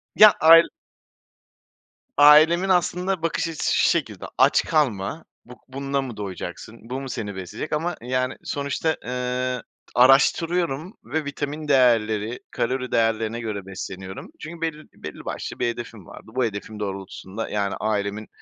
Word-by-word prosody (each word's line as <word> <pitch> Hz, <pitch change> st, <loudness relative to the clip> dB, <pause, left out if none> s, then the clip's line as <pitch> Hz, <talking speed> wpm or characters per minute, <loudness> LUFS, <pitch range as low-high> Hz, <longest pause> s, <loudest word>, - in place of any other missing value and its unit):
Ya, 215 Hz, 0 st, +9 dB
ail 165 Hz, +1 st, +8 dB, 1.5 s
Ailemin 155 Hz, +6 st, +7 dB
aslında 180 Hz, 0 st, +1 dB
bakış 165 Hz, +1 st, -1 dB
açısı 165 Hz, -2 st, -1 dB
şu -, -, +4 dB
şekilde, -, -, -1 dB
aç -, -, +4 dB
kalma, 140 Hz, -2 st, 0 dB, 0.2 s
buh 125 Hz, -, -12 dB
bununla 140 Hz, +1 st, -2 dB
mı 125 Hz, -5 st, -7 dB
doyacaksın, 100 Hz, +2 st, -7 dB
bu 130 Hz, +2 st, -3 dB
mu 135 Hz, -, -6 dB
seni 105 Hz, -5 st, -5 dB
besleyecek? 95 Hz, -, -6 dB
Ama, 165 Hz, +3 st, -1 dB
yani, 130 Hz, +2 st, -1 dB
sonuçta, 140 Hz, +3 st, -1 dB
ııı, 125 Hz, 0 st, -2 dB, 0.3 s
araştırıyorum 160 Hz, -, +3 dB
ve 150 Hz, +6 st, -3 dB
vitamin 145 Hz, +2 st, -4 dB
değerleri, 115 Hz, -4 st, +2 dB
kalori 130 Hz, +1 st, -2 dB
değerlerine 115 Hz, 0 st, +1 dB
göre 105 Hz, -4 st, -5 dB
besleniyorum. 95 Hz, 0 st, -7 dB
Çünkü 165 Hz, +2 st, -9 dB
bel 165 Hz, -1 st, 0 dB, 0.2 s
belli -, -, -9 dB
başlı -, -, -5 dB
bir -, -, +1 dB
hedefim 115 Hz, -4 st, -6 dB
vardı. 110 Hz, -, -13 dB
Bu 130 Hz, -, +2 dB
hedefim 105 Hz, 0 st, -6 dB
doğrultusunda, 100 Hz, +1 st, -5 dB
yani, 100 Hz, -1 st, -1 dB
ailemin 105 Hz, 0 st, -2 dB
125 Hz, 135 wpm, -23 LUFS, 110-155 Hz, 1.5 s, Ya